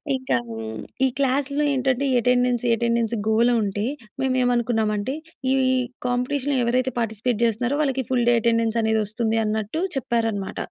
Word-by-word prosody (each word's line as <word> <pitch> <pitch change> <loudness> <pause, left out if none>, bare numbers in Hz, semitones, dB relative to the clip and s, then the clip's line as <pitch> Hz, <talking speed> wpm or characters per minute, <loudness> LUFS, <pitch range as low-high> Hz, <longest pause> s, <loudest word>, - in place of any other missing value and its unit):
ఇంకా 260 - -1
హ్మ్, 110 -1 -6 0.3
ఈ - - +4
క్లాస్‌లో 280 +2 +1
ఏంటంటే 260 0 0
ఎటెండెన్స్, 245 0 +2
ఎటెండెన్స్ 235 0 0
గోల 225 +2 +3
ఉంటే, 205 +1 -2 0.4
మేమేమనుకున్నామంటే 240 -2 +1 0.4
ఈ - - +4 0.5
కాంపిటీషన్‌లో 260 +3 0
ఎవరైతే 255 +1 +1
పార్టిసిపేట్ 225 +1 -1
జేస్తున్నారో, 235 +4 +1
వాళ్ళకి 265 -2 0
ఫుల్‌డే 240 -1 +3
ఎటెండెన్స్ 230 0 +1
అనేది 220 0 +2
వస్తుందన్నట్టు 220 - -1 0.2
చెప్పారనమాట. 225 -5 -1
235 Hz, 120 wpm, -23 LUFS, 220-255 Hz, 0.5 s, ఈ